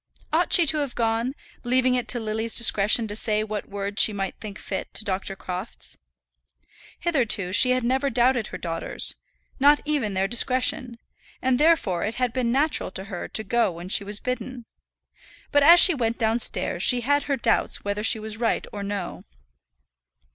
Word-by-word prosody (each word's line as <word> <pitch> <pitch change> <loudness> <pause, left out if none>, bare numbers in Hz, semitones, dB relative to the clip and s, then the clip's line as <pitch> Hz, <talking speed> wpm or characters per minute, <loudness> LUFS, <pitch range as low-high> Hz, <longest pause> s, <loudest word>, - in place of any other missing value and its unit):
Ought - - +1
she 345 - +5
to 310 +1 +3
have 280 -4 -4
gone, 230 +3 -1 0.3
leaving 255 +1 +1
it 250 -1 -2
to 240 - +3
Lily's 220 +1 0
discretion 220 0 +4
to 205 - -6
say 215 -1 +1
what 215 -1 -6
words 200 +1 -1
she - - +4
might 195 -2 -4
think 205 -3 -9
fit 190 - -6
to 215 - -3
Dr. 195 -1 -3
Crofts? 185 +3 -5 1.0
Hitherto 230 - 0
she 255 - +7
had 255 0 +1
never 265 +3 0
doubted 245 -1 +1
her - - -8
daughters 165 -1 -4 0.4
not 290 +2 +5
even 275 -10 -2
their 190 +1 0
discretion; 250 +1 +2 0.4
and 255 -1 0
therefore 295 - +2
it 220 +3 -3
had 250 -1 -2
been 250 -2 -1
natural 290 -1 0
to 190 0 -7
her 175 - -5
to 220 - -5
go 235 +2 +1
when 170 +2 -10
she 200 - 0
was 205 +1 -4
bidden. 250 -1 -6 0.9
But 290 - +3
as 335 +5 +7
she 360 - +8
went 230 -5 -2
downstairs 225 +1 +1
she 250 -1 +4
had 285 +4 0
her 280 -2 -1
doubts 230 -2 -1
whether 205 +1 -3
she 225 - +2
was 220 0 -6
right 230 0 -1
or 205 - -6
no. 200 -3 -6
230 Hz, 180 wpm, -23 LUFS, 205-255 Hz, 1.0 s, she